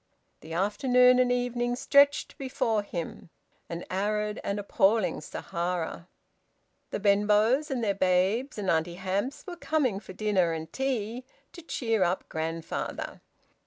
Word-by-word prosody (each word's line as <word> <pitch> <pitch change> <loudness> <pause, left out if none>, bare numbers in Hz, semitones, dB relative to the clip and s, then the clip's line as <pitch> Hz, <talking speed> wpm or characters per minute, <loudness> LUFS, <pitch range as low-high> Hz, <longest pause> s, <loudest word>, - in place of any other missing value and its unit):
The 160 +1 -9
afternoon 250 +7 +4
and 250 -1 +3
evening 245 0 0
stretched 280 +2 +3
before 235 -5 0
him, 175 -4 -6 0.4
an 170 +1 -5
arid 210 +2 -1
and 200 - -2
appalling 205 +1 +2
Sahara. 170 - -4 0.8
The - - -3
Benbows, 210 +8 +3
and 255 -4 -2
their 205 -2 +2
babes, 195 +8 +1
and 205 -2 -3
Auntie 165 +1 0
Hamps 195 +8 -3
were 360 -3 -6
coming 280 - 0
for 190 -2 -11
dinner 185 -5 +1
and 160 0 -6
tea, 250 -3 -2 0.3
to 345 - -11
cheer 225 - -1
up 180 +1 +1
grandfather. 160 +1 -4
210 Hz, 130 wpm, -28 LUFS, 185-250 Hz, 0.8 s, afternoon